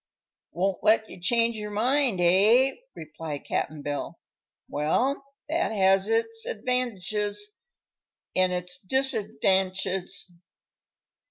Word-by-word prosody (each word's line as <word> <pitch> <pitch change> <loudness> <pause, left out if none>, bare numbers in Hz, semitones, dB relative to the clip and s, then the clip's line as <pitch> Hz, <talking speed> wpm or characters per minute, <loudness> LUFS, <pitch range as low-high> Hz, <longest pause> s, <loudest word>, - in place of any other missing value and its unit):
"Won't 185 +3 -2
let 220 +1 +4
you 175 - -11
change 230 +4 +2
your 210 0 -5
mind, 240 +1 +1
eh?" 210 +10 +5 0.2
replied 155 -1 -7
Cap'n 150 -1 -3
Bill. 145 0 -4 0.5
"Well, 245 - 0 0.2
that 330 -1 0
has 195 -1 +3
its 225 0 0
advantidges, 210 -3 -1 1.0
an' 185 0 +3
its 180 0 -4
disadvantidges. 195 -6 0
205 Hz, 95 wpm, -26 LUFS, 180-230 Hz, 1.0 s, eh